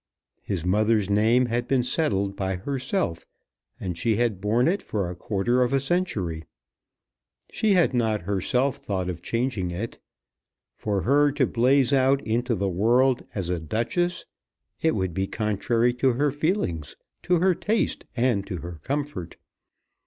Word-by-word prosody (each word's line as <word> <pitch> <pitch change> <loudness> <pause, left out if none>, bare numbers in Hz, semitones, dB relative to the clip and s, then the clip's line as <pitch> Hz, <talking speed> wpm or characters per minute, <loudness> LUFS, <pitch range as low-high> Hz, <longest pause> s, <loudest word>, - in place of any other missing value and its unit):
His 90 -4 -3
mother's 105 +1 +2
name 115 +5 +4
had 120 0 -2
been 130 -2 +2
settled 100 - 0
by 95 -1 -2
herself, 130 - -2 0.6
and 90 -3 -4
she 110 +5 +1
had 115 -5 0
borne 115 +6 +2
it 190 +4 +1
for 100 -4 -2
a - - -7
quarter 105 +7 0
of 125 +1 +1
a 135 - +4
century. 120 - -1 1.1
She 215 -2 +2
had 175 -7 +3
not 110 -5 0
herself 115 +8 0
thought 95 -2 -3
of 85 -1 -9
changing 115 -3 -1
it. 95 +7 -5 0.8
For 100 -4 -2
her 145 - +4
to 140 -2 +2
blaze 130 +3 +3
out 135 +1 +3
into 120 +2 0
the 100 0 -1
world 120 +8 +2
as 90 -4 -2
a 90 - -1
Duchess, 120 - -1 0.6
it 160 0 +2
would 95 -3 -1
be 95 +3 -1
contrary 115 +3 0
to 130 +1 +2
her 145 +4 +1
feelings, 145 - -1 0.3
to 180 - +2
her 185 +2 +3
taste, 210 +5 -1
and 120 -5 +2
to 95 -3 -4
her 85 -1 -8
comfort! 140 - -4
115 Hz, 155 wpm, -25 LUFS, 95-135 Hz, 1.1 s, name